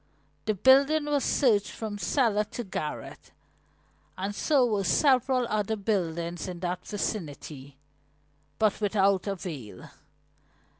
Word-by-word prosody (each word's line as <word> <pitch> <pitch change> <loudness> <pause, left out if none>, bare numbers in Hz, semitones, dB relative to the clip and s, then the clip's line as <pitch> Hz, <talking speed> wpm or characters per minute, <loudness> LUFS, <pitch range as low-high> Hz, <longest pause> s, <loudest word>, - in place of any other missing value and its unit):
The 215 -1 0
building 275 +8 +5
was 290 -2 0
searched 220 -8 +2
from 215 -2 -6
cellar 220 -4 +2
to 240 +3 -6
garret, 155 -7 -6 0.9
and 195 +2 -3
so 275 +3 +3
were 210 -4 0
several 255 - +3
other 215 0 -1
buildings 175 -5 -2
in 180 -2 -6
that 180 0 -3
vicinity, 150 -9 -5 0.8
but 215 -1 +1
without 200 -1 +2
avail. 155 - -6
205 Hz, 110 wpm, -28 LUFS, 180-240 Hz, 0.9 s, building